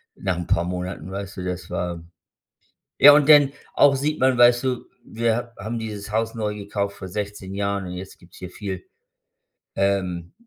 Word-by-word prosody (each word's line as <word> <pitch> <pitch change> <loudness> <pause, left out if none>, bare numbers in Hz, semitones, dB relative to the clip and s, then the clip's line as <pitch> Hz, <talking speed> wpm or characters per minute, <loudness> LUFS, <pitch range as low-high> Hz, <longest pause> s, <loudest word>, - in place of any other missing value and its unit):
nach 95 -3 -2
'n 90 - -5
paar 85 - +2
Monaten, 90 0 -5
weißt 100 0 -6
du. 90 - -4
Das 90 -1 -5
war 85 -2 -3 1.0
ja, 145 +1 +10
und 145 0 +4
dann 145 -3 +7 0.2
auch 140 - +5
sieht 150 +3 -2
man, 130 -1 +3
weißt 120 +1 +5
du, 125 -2 -2 0.2
wir 115 0 0
ha 120 -1 -6
haben 115 +2 -3
dieses 105 -2 -6
Haus 115 0 -1
neu 105 -2 -2
gekauft 100 -1 -4
vor 95 -2 -8
16 100 0 -5
Jahren 100 -1 -2
und 90 - -6
jetzt 95 +2 -8
gibt's 90 - -18
hier 90 - -8
viel, 95 -1 -6 0.9
ähm, 95 -3 -1
100 Hz, 185 wpm, -23 LUFS, 90-115 Hz, 1.0 s, ja